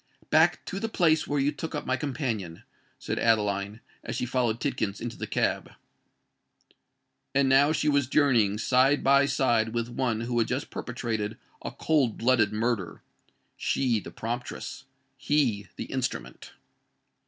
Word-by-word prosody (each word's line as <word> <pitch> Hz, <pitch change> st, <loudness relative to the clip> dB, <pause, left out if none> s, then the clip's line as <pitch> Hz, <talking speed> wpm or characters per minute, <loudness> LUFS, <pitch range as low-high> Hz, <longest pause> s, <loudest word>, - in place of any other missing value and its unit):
"Back -, -, +4 dB
to 195 Hz, -, -4 dB
the 225 Hz, -, -2 dB
place 160 Hz, -6 st, +2 dB
where 145 Hz, 0 st, 0 dB
you 140 Hz, +2 st, +2 dB
took 160 Hz, +2 st, -6 dB
up 145 Hz, -, -4 dB
my 130 Hz, -, +1 dB
companion," 120 Hz, -, -4 dB, 0.3 s
said -, -, -3 dB
Adeline, 105 Hz, -1 st, +1 dB, 0.2 s
as -, -, -5 dB
she -, -, -1 dB
followed 120 Hz, -2 st, 0 dB
Tidkins 110 Hz, -8 st, -2 dB
into 120 Hz, 0 st, -5 dB
the -, -, -5 dB
cab. -, -, -1 dB, 1.6 s
And 140 Hz, -1 st, +4 dB
now 135 Hz, +3 st, +5 dB
she 155 Hz, 0 st, 0 dB
was 140 Hz, -3 st, +3 dB
journeying 125 Hz, -8 st, +3 dB
side 130 Hz, +5 st, +3 dB
by 140 Hz, +1 st, +5 dB
side 120 Hz, -5 st, +1 dB
with 115 Hz, 0 st, -1 dB
one 120 Hz, -2 st, -1 dB
who 120 Hz, 0 st, -1 dB
had 115 Hz, -, +2 dB
just 130 Hz, +3 st, -3 dB
perpetrated 115 Hz, -3 st, -3 dB, 0.2 s
a -, -, -4 dB
cold 145 Hz, -8 st, +1 dB
blooded 115 Hz, -3 st, +3 dB
murder,—she 115 Hz, +2 st, -3 dB
the 85 Hz, -, -9 dB
promptress—he 130 Hz, -, -3 dB
the -, -, -5 dB
instrument! 130 Hz, -2 st, -4 dB
125 Hz, 140 wpm, -27 LUFS, 110-140 Hz, 1.6 s, now